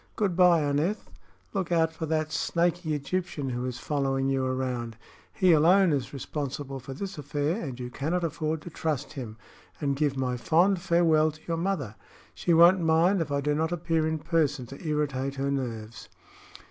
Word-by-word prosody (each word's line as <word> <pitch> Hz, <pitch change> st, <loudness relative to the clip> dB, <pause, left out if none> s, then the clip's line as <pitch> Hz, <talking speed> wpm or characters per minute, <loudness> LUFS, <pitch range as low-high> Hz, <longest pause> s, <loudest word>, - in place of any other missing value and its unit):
Good 200 Hz, -5 st, 0 dB
by, 175 Hz, -2 st, +5 dB
Aneth. 150 Hz, +9 st, -1 dB, 0.4 s
Look 190 Hz, -4 st, -2 dB
out 160 Hz, -1 st, +2 dB
for 160 Hz, 0 st, -5 dB
that 155 Hz, 0 st, -1 dB
snakey 170 Hz, +1 st, 0 dB
Egyptian 145 Hz, -1 st, -3 dB
who 125 Hz, +1 st, -3 dB
is 125 Hz, -1 st, -4 dB
following 135 Hz, -1 st, -1 dB
you 135 Hz, -1 st, +1 dB
around. 125 Hz, -3 st, -2 dB, 0.3 s
He 185 Hz, -4 st, +3 dB
alone 170 Hz, +3 st, +5 dB
is 135 Hz, -2 st, -2 dB
responsible 140 Hz, -1 st, -5 dB
for 130 Hz, +1 st, -8 dB
this 195 Hz, +1 st, -6 dB
affair, 145 Hz, +7 st, -1 dB
and 130 Hz, -5 st, -6 dB
you 125 Hz, 0 st, -5 dB
cannot 165 Hz, +7 st, -2 dB
afford 155 Hz, -1 st, -2 dB
to 175 Hz, -, -9 dB
trust 155 Hz, -4 st, -3 dB
him; 120 Hz, -7 st, -7 dB, 0.4 s
and 140 Hz, -2 st, 0 dB
give 140 Hz, -1 st, 0 dB
my 125 Hz, -1 st, -1 dB
fond 175 Hz, +8 st, +3 dB
farewell 165 Hz, -3 st, +3 dB
to 155 Hz, 0 st, -11 dB
your 165 Hz, -1 st, -1 dB
mother. 165 Hz, -, -2 dB, 0.4 s
She 175 Hz, -, -1 dB
won't 170 Hz, +3 st, +7 dB
mind 165 Hz, +4 st, +3 dB
if 155 Hz, -3 st, -3 dB
I 140 Hz, 0 st, 0 dB
do 150 Hz, +1 st, 0 dB
not 160 Hz, +2 st, 0 dB
appear 165 Hz, -2 st, 0 dB
in 160 Hz, 0 st, -1 dB
person 150 Hz, -5 st, 0 dB
to 135 Hz, +7 st, -11 dB
irritate 140 Hz, -3 st, -1 dB
her 140 Hz, 0 st, -1 dB
nerves." 115 Hz, -5 st, -5 dB
150 Hz, 180 wpm, -27 LUFS, 135-170 Hz, 0.4 s, won't